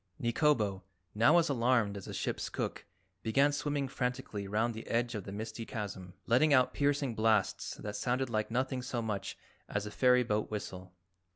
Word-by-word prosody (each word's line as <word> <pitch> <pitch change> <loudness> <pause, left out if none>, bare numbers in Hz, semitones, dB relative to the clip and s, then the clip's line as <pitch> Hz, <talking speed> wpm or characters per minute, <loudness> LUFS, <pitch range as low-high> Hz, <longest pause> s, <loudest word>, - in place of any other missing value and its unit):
Nikobo, 120 -6 +2 0.3
now 120 +10 +5
as 170 - +4
alarmed 120 -5 +2
as 100 - -7
the - - -7
ship's - - -2
cook, - - -4 0.4
began 140 +6 +3
swimming 145 -1 -1
frantically 125 -6 -3
round 110 +4 +1
the 110 +1 -8
edge 120 +1 0
of 105 -4 -5
the 95 - -6
misty 110 +2 -5
chasm, 95 -5 -6
letting 140 +5 +5
out 130 -1 +3
piercing 140 -3 +1
blasts 110 -2 +1
that 105 0 -6
sounded 125 +5 0
like 110 -2 -1
nothing 130 +2 -1
so 125 -2 -3
much 100 -3 -3 0.3
as 105 0 -2
a 105 - -6
ferry 125 +2 +4
boat 105 -2 -1
whistle. 95 -3 -6
115 Hz, 175 wpm, -32 LUFS, 105-130 Hz, 0.4 s, now